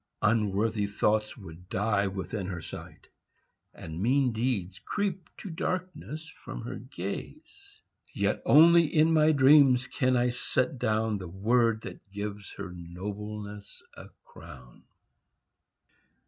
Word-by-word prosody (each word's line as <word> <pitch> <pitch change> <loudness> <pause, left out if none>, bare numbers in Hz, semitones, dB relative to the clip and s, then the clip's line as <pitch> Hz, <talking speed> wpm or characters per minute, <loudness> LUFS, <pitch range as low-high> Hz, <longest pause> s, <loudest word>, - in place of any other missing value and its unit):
Unworthy 105 -1 +1
thoughts 105 +2 0
would 90 -3 -12
die 100 0 +1
within 95 +1 -4
her 90 -2 -4
sight, 80 - -10 0.6
And 80 +2 -8
mean 130 +3 +3
deeds 110 -6 -2
creep 190 -4 -3
to 200 - -7
darkness 160 -2 -4 0.2
from - - -7
her - - -5
gaze. 365 - -8 0.3
Yet - - 0
only 170 +2 +7
in 155 +2 +3
my 155 0 +5
dreams 135 -3 +6
can 130 -2 +1
I 120 0 +2
set 125 +1 0
down 110 -2 0
The 95 - -7
word 110 +5 +1
that 100 - -10
gives 100 0 -6
her 95 -3 -7
nobleness 100 +4 -7
a - - -11
crown. 65 -7 -14
110 Hz, 120 wpm, -28 LUFS, 100-140 Hz, 0.6 s, only